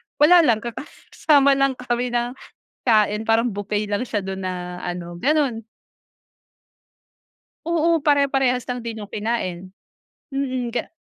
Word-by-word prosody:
wala 345 +4 +6
lang 235 -9 +3
kakasama 280 +3 +1
lang 275 -1 +2
kami 250 0 -2
ng 240 0 -1 0.5
kain 215 -3 +3
parang 225 +2 +2
buffet 205 +1 -2
lang 205 +3 -1
siya 225 -4 -2
dun 190 0 -5
na 180 -1 -5
ano 175 -1 -5
ganon. 275 -6 +1 2.0
Oo 335 0 +2
pare-parehas 270 -3 +2
lang 245 -1 -4
din 225 -2 -5
yung 205 - -9
kinain. 190 -4 -3 0.6
Mm 255 -3 -2
ga - - -2
235 Hz, 125 wpm, -22 LUFS, 205-270 Hz, 2.0 s, wala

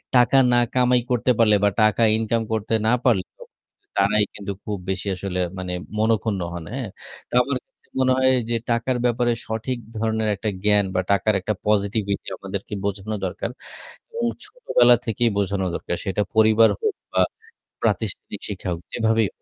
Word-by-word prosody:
টাকা 125 +2 +5
না 120 - +4 0.2
কামাই 125 -1 +3
করতে 125 +1 +2
পারলে 110 -2 +5
বা 105 - +5
টাকা 110 +1 +3 0.2
ইনকাম 115 +1 0
করতে 110 +1 -1
না - - +4
পারলে 110 -8 +3 0.8
তারাই 105 +2 +3
কিন্তু 100 0 -5
খুব 105 -1 -3
বেশি 95 +1 -2
আসলে, 90 0 -4 0.2
মানে 90 -1 -4 0.2
মনখুন্ন 110 -2 +1
হন, 85 -2 -6
হ্যাঁ! 130 -5 -4 0.4
তো - - -18
আমার 140 0 -1
কাছে - - -39
মনে 130 0 +3
হয় 130 0 +4 0.2
যে 120 - +1
টাকার 115 +2 +1
ব্যাপারে 120 0 +2 0.2
সঠিক 115 +3 -3 0.2
ধরনের 110 0 0
একটা 105 +2 -2
জ্ঞান 105 -1 +4
বা - - +3
টাকার 100 +2 +3
একটা 105 +3 -1
পজিটিভিটি 100 -1 0
আমাদেরকে - - -6
বোঝানো 100 +2 -3
দরকার। 90 - -3 0.6
এবং 470 0 -3 0.2
ছোটবেলা 125 - +4
থেকেই 115 +1 +1
বোঝানো 100 -1 0
দরকার। - - -3
সেটা 95 +1 0
পরিবার 110 +1 +6
হোক 435 -2 +1 0.2
বা - - +3 0.6
প্রাতিষ্ঠানিক - - -2
শিক্ষা 95 -2 -5
হোক, 85 - -7
যেভাবেই 110 -2 +2
110 Hz, 160 wpm, -23 LUFS, 100-120 Hz, 0.8 s, পরিবার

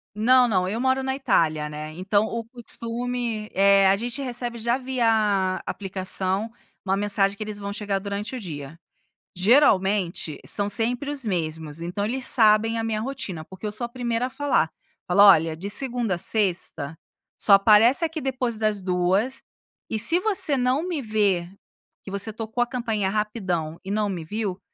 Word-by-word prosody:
Não, 250 +4 +5
não. 185 -4 +1
Eu 215 +5 -3
moro 260 0 +1
na 265 0 -1
Itália, 155 - +1
né, 150 +1 -7
então 200 +5 +1
o 230 +1 -4
costume, 235 -1 -4
eh, 195 0 +5
a 195 - +5
gente 240 +6 -4
recebe 240 -2 -4
já 235 +2 0
via 220 -7 +1
aplicação 190 +2 -3 0.3
uma 195 0 0
mensagem 200 0 +2
que - - -4
eles 210 -1 -7
vão 200 0 -5
chegar 200 -1 -2
durante 205 +4 -5
o - - -5
dia. 150 - -8 0.6
Geralmente, 195 - +2
são 205 -1 +2
sempre 245 +6 0
os 285 -2 -5
mesmos, 160 -6 -3
então 175 +4 -3
eles 255 +5 -3
sabem 225 0 +3
a 225 - -2
minha 220 -1 -2
rotina, 210 -9 -5
porque 190 +4 -11
eu - - -3
sou 235 +3 -3
a - - -8
primeira 240 -1 -2
a - - -4
falar. 275 - 0 0.4
Falo: 180 +3 +4
"Olha, 165 -6 +6
de 195 +5 -6
segunda 240 -3 -1
a - - -6
sexta, 175 -6 0 0.4
só 205 - +5
aparece 215 - +6
aqui 320 -1 -2
depois 255 -5 -2
das 215 -2 0
14h, 185 +7 0 0.5
e 220 - -2
se 325 +11 +6
você 375 -8 +1
não 255 +5 +1
me 335 -5 -2
ver, 205 -6 0 0.5
que 195 - -9
você 200 +2 +1
tocou 225 +2 -4
a - - -6
campainha 225 -5 -2
rapidão 190 -7 -2
e - - -6
não 210 0 0
me 175 -4 -4
viu, 200 0 -4
210 Hz, 175 wpm, -24 LUFS, 190-240 Hz, 0.6 s, Olha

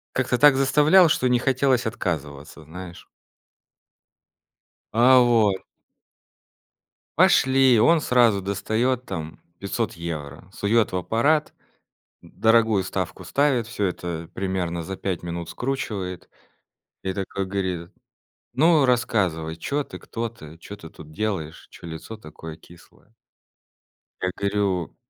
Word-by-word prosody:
как-то 130 -1 +1
так 145 0 +6
заставлял, 150 +6 +5
что 130 - +1
не 125 -1 +3
хотелось 130 -2 +1
отказываться, 75 - -5
знаешь. 85 +2 -10 1.9
А. 125 +3 +6
Вот. 115 -5 +3 1.6
Пошли, 130 -3 +5
он 165 +7 +4
сразу 120 -5 +3
достает 115 +6 -1
там 80 -4 -6 0.2
500 105 +3 -3
евро. 80 0 -7
Сует 110 +1 +1
в 90 - -1
аппарат. 140 - +1 0.7
Д - - -17
дорогую 110 -4 +3
ставку 95 -1 -4
ставит, 130 - +1
всё 115 -3 -4
это 85 -3 -3
примерно 90 -3 -2
за 95 +3 -6
5 95 -3 -4
минут 85 -1 -5
скручивает. 105 -9 -4 0.7
И 95 0 -2
такой 95 0 -4
говорит: 95 -3 -3 0.6
"Ну 155 0 +4
рассказывай, 95 -10 0
чё 145 - -2
ты, - - -11
кто 115 0 -5
ты, 80 -8 -13
чё 105 +3 -10
ты 80 - -11
тут 80 -2 -14
делаешь, 95 -5 -4
чё 85 - -12
лицо 80 +7 -8
такое 80 -4 -10
кислое?" 85 +1 -20 1.1
Я 95 0 0
говорю 100 -3 -1
100 Hz, 120 wpm, -23 LUFS, 85-125 Hz, 1.9 s, так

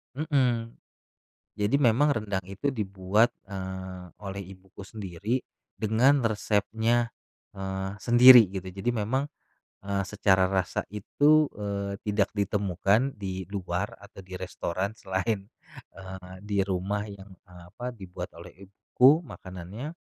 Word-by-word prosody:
Mhm. 125 -6 0 0.8
Jadi 105 +5 +1
memang 140 +4 +4
rendang 100 -6 -2
itu 100 +9 -4
dibuat, 105 +1 +1 0.2
eee, 95 -1 -6
oleh 100 -1 -6
ibuku 95 +1 -13
sendiri, 105 +3 -3 0.4
dengan 120 +6 +4
resepnya, 115 +2 +1 0.4
eee, 95 0 -4
sendiri, 120 +1 +9
gitu. 95 -1 -5
Jadi 95 +6 -2
memang, 120 +5 -1 0.6
eee, 100 -1 0
secara 95 -2 +3
rasa 95 -1 0
itu, 145 +9 +3
eee, 100 -1 -3
tidak 105 -1 +1
ditemukan 100 +5 +1
di 95 -2 -4
luar 95 0 -3
atau 100 - -16
di 95 0 -11
restoran 95 +2 -3
selain, 95 +1 -2 0.5
eee, 95 -1 -9
di 105 -1 -2
rumah 100 +2 -1
yang, 100 0 -11 0.2
eee, 90 -1 -14
apa, 125 +5 -5
yang - - -21
dibuat 90 -1 -7
oleh - - -10 0.2
ibuku 130 - +4
makanannya. 95 - -8
100 Hz, 125 wpm, -27 LUFS, 95-115 Hz, 0.8 s, sendiri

